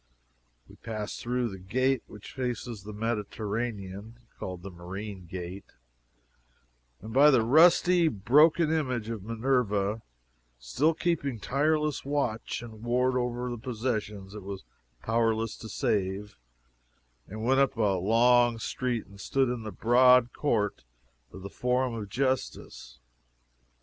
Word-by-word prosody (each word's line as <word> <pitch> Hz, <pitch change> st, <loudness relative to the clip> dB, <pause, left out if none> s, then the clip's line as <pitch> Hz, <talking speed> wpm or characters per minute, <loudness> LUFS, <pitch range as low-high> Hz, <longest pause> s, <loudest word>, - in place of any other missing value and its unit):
We -, -, -16 dB
passed 110 Hz, -2 st, -5 dB
through 125 Hz, 0 st, -1 dB
the 95 Hz, -2 st, -8 dB
gate 130 Hz, +7 st, 0 dB
which 105 Hz, -1 st, -11 dB
faces 125 Hz, -4 st, -4 dB
the 105 Hz, +2 st, -9 dB
Mediterranean, 105 Hz, -1 st, -4 dB, 0.2 s
(called 90 Hz, -1 st, -6 dB
the 95 Hz, -, -7 dB
"Marine 95 Hz, +2 st, -8 dB
Gate,") 90 Hz, +2 st, -8 dB, 1.3 s
and 110 Hz, +1 st, -7 dB
by 140 Hz, +4 st, +7 dB
the 130 Hz, -6 st, +4 dB
rusty, 170 Hz, +6 st, +5 dB
broken 150 Hz, -, +4 dB
image 130 Hz, -8 st, -1 dB
of 115 Hz, -3 st, -4 dB
Minerva, 110 Hz, -2 st, 0 dB, 0.6 s
still 135 Hz, -, 0 dB
keeping 145 Hz, -9 st, -1 dB
tireless 150 Hz, +3 st, 0 dB
watch 130 Hz, -5 st, -2 dB
and 110 Hz, -2 st, -11 dB
ward 125 Hz, +2 st, +1 dB
over 125 Hz, 0 st, -2 dB
the 120 Hz, -, -5 dB
possessions 110 Hz, -5 st, -4 dB
it 105 Hz, -, -7 dB
was 100 Hz, 0 st, -7 dB, 0.4 s
powerless 115 Hz, -1 st, 0 dB
to 110 Hz, -, -9 dB
save, 100 Hz, 0 st, -1 dB, 0.9 s
and 110 Hz, +2 st, -7 dB
went 135 Hz, +3 st, +3 dB
up 135 Hz, -3 st, +2 dB
a 100 Hz, -4 st, +2 dB
long 120 Hz, +4 st, +4 dB
street 120 Hz, 0 st, -2 dB
and 100 Hz, 0 st, -14 dB
stood 135 Hz, -2 st, +1 dB
in 125 Hz, -1 st, -3 dB
the 110 Hz, -1 st, -6 dB
broad 125 Hz, +3 st, +5 dB
court 105 Hz, -, -1 dB, 0.5 s
of 95 Hz, -, -11 dB
the 100 Hz, -, -6 dB
Forum 125 Hz, 0 st, 0 dB
of 105 Hz, -3 st, -5 dB
Justice. 125 Hz, -, -3 dB
115 Hz, 130 wpm, -28 LUFS, 105-130 Hz, 1.3 s, by